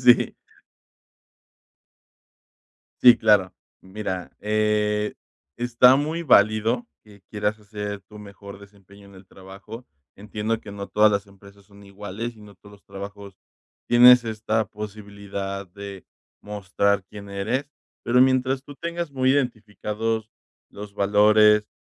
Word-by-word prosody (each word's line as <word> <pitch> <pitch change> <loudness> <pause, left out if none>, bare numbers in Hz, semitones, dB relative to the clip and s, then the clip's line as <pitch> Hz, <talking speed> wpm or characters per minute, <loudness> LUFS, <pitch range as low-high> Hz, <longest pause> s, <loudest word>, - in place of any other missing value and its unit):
sí. 120 -1 +5 2.7
Sí, 120 -2 +9
claro. 105 -4 +3 0.3
Mira, 95 -2 -5
eh, 105 0 0 0.4
está 120 +2 +5
muy 155 +4 -2
válido 110 -1 +3 0.2
que 105 -2 -18
quieras 105 0 -2
hacer 105 -1 -6
tu 105 0 -13
mejor 100 -1 -12
desempeño 100 0 -18
en 100 - -17
el 95 0 -16
trabajo. 95 +6 -12 0.3
Entiendo 105 +2 -3
que 105 - -11
no 100 -1 -7
todas 105 0 +4
las 100 0 -1
empresas 100 0 -18
son 100 0 -18
iguales, 100 +4 -7
y - - -17
no 105 -1 -14
todos 105 +2 -18
los 100 - -22
trabajos. 100 0 -10 0.5
Tienes 125 0 +7
esta 110 0 -1
posibilidad 100 -2 -7
de 100 0 -10 0.4
mostrar 100 -1 -1
quién 100 +1 -11
eres. 115 +8 -3 0.4
Pero 125 +1 +3
mientras 130 0 +2
tú 145 0 -12
tengas 170 0 -5
muy 130 -1 +1
identificados 110 -3 -2 0.4
los 100 0 -10
valores 105 +1 +4
105 Hz, 125 wpm, -23 LUFS, 100-115 Hz, 2.7 s, Sí